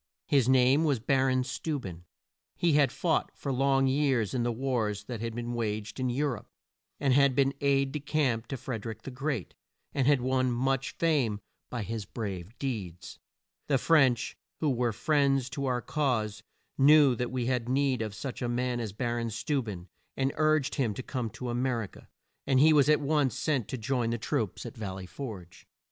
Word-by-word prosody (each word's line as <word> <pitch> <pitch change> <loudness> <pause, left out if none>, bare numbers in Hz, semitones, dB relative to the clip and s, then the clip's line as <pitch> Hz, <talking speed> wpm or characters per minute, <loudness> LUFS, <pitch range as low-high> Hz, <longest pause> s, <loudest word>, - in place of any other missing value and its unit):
His 135 -4 +3
name 130 +3 +5
was 145 -6 +2
Bar 135 +2 +2
on 130 0 +2
Steu 145 +4 -3
ben. 90 -6 -9 0.5
He 170 -3 +2
had 145 -2 +4
fought 165 -3 0
for 140 - -3
long 135 +1 +3
years 130 -5 +1
in 125 - 0
the 120 0 +1
wars 115 -5 -1
that 115 0 -6
had 115 -1 -4
been 120 0 -4
waged 110 -1 -3
in 130 -1 0
Eu 135 +5 0
rope, 125 -7 -3 0.5
had 140 -1 +4
been 135 0 +3
aide 140 -1 +2
de 150 - -3
camp 135 -6 0
to 135 - -4
Fred 115 -4 -5
er - - -4
ick 110 - -8
the 135 - -6
Great, 135 - -3 0.4
and 135 -2 +1
had 145 -2 +5
won 130 0 +1
much 135 +2 -1
fame 140 -11 +1 0.3
by 120 -3 -3
his 110 +1 -4
brave 100 -1 -6
deeds. 100 - -5 0.5
The 140 - +3
French, 135 -4 +3 0.2
who 150 -3 +1
were 120 -2 +1
friends 135 +1 +1
to 140 -2 -3
our 125 -1 0
cause, 120 -8 -1 0.4
knew 145 -1 +7
that 125 +1 -2
we 125 -1 -2
had 125 -1 -1
need 135 -2 +1
of 110 -2 -4
such 130 +3 -6
a 120 - -1
man 125 0 -1
as 110 -4 -4
Bar 120 +2 -2
on 115 0 -2
Steu 115 +6 -1
ben, 95 -5 -7 0.3
and 135 0 +1
urged 155 -2 +2
him 115 -7 0
to 130 - -5
come 125 -4 -3
to 125 +3 -6
A - - -2
mer 120 -1 0
i - - -4
ca, - - -15 0.4
and 135 -2 +4
he 155 +3 +6
was 145 -1 +5
at 150 0 +4
once 145 -3 +1
sent 140 -6 0
to 130 - -4
join 120 0 -1
the 115 - -1
troops - - -2
at - - -7
Val 100 -4 -5
ley 95 -1 -7
Forge. 95 -6 -9
130 Hz, 205 wpm, -29 LUFS, 115-140 Hz, 0.5 s, knew